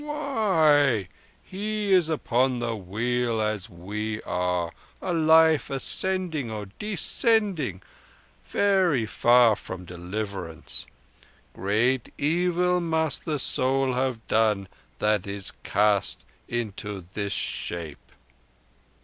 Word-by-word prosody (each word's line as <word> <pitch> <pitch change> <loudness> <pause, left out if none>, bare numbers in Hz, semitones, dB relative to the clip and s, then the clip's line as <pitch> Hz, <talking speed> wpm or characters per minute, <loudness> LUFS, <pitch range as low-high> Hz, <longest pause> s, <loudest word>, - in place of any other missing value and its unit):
"Why? 165 - +2 0.4
He 210 +1 -2
is 175 -4 +4
upon 130 -4 +1
the 120 -1 -2
Wheel 115 +4 -1
as 105 -1 -1
we 105 +5 -4
are—a 90 - -3
life 160 -2 +5
ascending 160 0 -1
or 105 -2 -5
descending—very 190 - 0
far 120 +1 +5
from 90 -2 -8
deliverance. 90 -1 -5 0.7
Great 115 +6 0
evil 180 +3 +2
must 160 -2 0
the 155 -3 -1
soul 135 0 +1
have 125 -3 -1
done 105 -3 +2 0.3
that 105 -2 +1
is 100 -1 -4
cast 105 -1 +1 0.2
into 105 -5 -4
this 100 -1 -2
shape." 85 -6 -3
120 Hz, 90 wpm, -26 LUFS, 105-160 Hz, 0.7 s, life